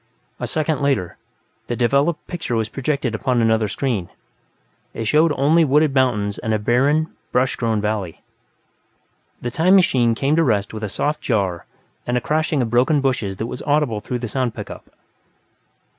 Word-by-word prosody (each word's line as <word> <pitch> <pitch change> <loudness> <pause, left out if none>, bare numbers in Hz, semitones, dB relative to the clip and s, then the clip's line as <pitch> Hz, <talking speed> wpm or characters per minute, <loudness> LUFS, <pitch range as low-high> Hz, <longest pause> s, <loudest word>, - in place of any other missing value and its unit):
A - - -3
second 155 -1 -1
later, 135 -11 0 0.5
the 120 - -2
developed 140 +7 +1
picture 165 -9 -4
was 110 -1 -1
projected 135 -1 -2
upon 125 +2 0
another 110 -1 +2
screen; 110 -6 -2 0.9
it 115 - -3
showed 155 +7 +3
only 155 +5 +3
wooded 150 0 +3
mountains 105 -7 +1
and 110 -1 -1
a - - +2
barren, 140 +9 +1 0.2
brush 125 +1 +1
grown 115 -3 0
valley. 105 -5 -3 1.2
The 120 - -3
"time 175 +8 +4
machine" 125 -11 +3
came 140 +5 +1
to 165 - +4
rest 105 -8 0
with 110 - -6
a 105 - -3
soft 150 +8 -2
jar 95 -7 -1 0.4
and 120 0 +1
a - - +2
crashing 155 0 0
of 115 - -4
broken 130 +5 +3
bushes 125 -8 -1
that 110 - -3
was 125 +2 -6
audible 145 -8 0
through 125 +4 -3
the 120 0 -4
sound 125 0 -2
pickup. - - -9
125 Hz, 170 wpm, -21 LUFS, 110-145 Hz, 1.2 s, time